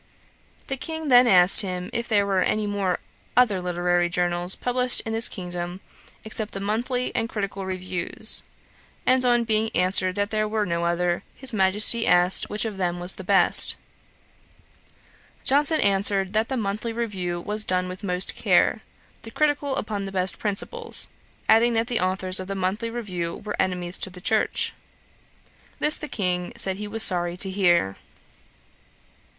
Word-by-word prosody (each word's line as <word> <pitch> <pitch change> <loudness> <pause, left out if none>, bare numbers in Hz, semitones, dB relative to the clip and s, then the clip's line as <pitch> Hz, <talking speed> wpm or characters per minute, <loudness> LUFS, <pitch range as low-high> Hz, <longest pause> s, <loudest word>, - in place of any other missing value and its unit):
The 270 - -5
King 320 +1 -6
then 245 -1 +5
asked 180 -3 +8
him 180 -2 -6
if 235 0 -4
there 205 -3 +1
were 195 -2 -1
any 215 +2 -1 0.7
other 215 -7 +2
literary 175 0 -1
journals 175 +1 -1
published 250 0 +1
in 225 - -6
this 225 +1 +2
kingdom, 175 -1 -7 0.5
except 215 -1 -7
the - - -4
Monthly 240 +5 -3
and 225 - -2
Critical 200 -3 -6
Reviews; 185 +3 -3 0.6
and 255 0 +4
on 240 -1 +1
being 220 -1 -1
answered 185 0 +2
there 215 +1 -2
were 215 0 -2
no 170 -2 -3
other, 175 0 -2
his 265 -3 +1
Majesty 210 +3 +5
asked 180 +1 +3
which 210 +2 -1
of 215 -3 -6
them 175 -2 -3
was 180 +1 -1
the 190 - -11
best: 190 -1 +9 1.7
Johnson 295 +3 +3
answered, 195 -1 +2
that 220 +1 -1
the 265 - -3
Monthly 215 +1 -4
Review 190 -7 -4
was 210 +4 -2
done 185 -2 -2
with 185 +3 -10
most 180 -1 -1
care, - - +1 0.4
the 225 - -11
Critical 290 +1 -2
upon 205 -2 -5
the 195 - -7
best 185 0 -3
principles; 455 - -1 0.4
adding 235 +2 +3
that 225 0 0
the 240 -1 -2
authours 185 0 0
of 185 - -7
the 195 - -5
Monthly 195 +5 -3
Review 185 -8 -6
were 210 0 -7
enemies 180 -1 -3
to - - -3
the 180 0 -12
Church. 215 +4 -1 1.0
This 300 0 +4
the 300 - -7
King 180 -7 -4
said 190 -1 -1
he 210 +1 -7
was 220 +1 +1
sorry 175 -1 +1
to 190 +1 -1
hear. 175 - 0
200 Hz, 160 wpm, -22 LUFS, 180-225 Hz, 1.7 s, best